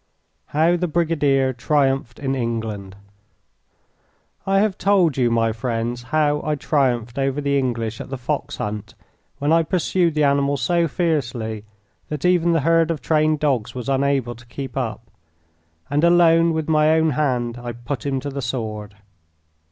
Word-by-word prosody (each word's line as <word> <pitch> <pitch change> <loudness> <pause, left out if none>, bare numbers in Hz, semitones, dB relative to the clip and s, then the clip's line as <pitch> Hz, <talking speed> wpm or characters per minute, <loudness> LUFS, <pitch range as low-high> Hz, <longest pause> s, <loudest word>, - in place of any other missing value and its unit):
How 165 +4 +2
the 180 +1 -1
Brigadier 150 -5 +1
Triumphed 135 -1 0
in 135 -1 -2
England 110 -6 -3 1.5
I 195 0 +3
have 200 -1 +2
told 190 -7 +3
you, 125 -3 +2
my 115 -1 +2
friends, 115 +1 -3
how 150 +2 +1
I 150 0 0
triumphed 130 -4 0
over 135 +1 0
the 140 -1 0
English 115 -5 -1
at - - -9
the 135 - -4
fox 125 - -3
hunt 105 0 -5 0.4
when 145 +3 +1
I 165 - +5
pursued 175 0 0
the 150 - +2
animal 140 0 +2
so 170 +6 +1
fiercely 120 - -2 0.4
that 150 +1 -4
even 175 -1 +3
the 165 -2 +2
herd 165 +2 +3
of 165 -3 -1
trained 155 0 +1
dogs 130 -7 0
was 125 0 -5
unable 135 -2 +1
to 120 0 -16
keep 135 +2 -7
up, 120 -3 -3 0.8
and 145 +3 0
alone 170 -1 +5
with 160 -1 -2
my 155 0 +4
own 160 -1 +2
hand 125 -4 -1
I 120 0 -5
put 120 +4 -5
him 135 -2 -1
to 140 +1 -5
the 140 0 -4
sword. 110 -4 -4
140 Hz, 160 wpm, -21 LUFS, 120-160 Hz, 1.5 s, I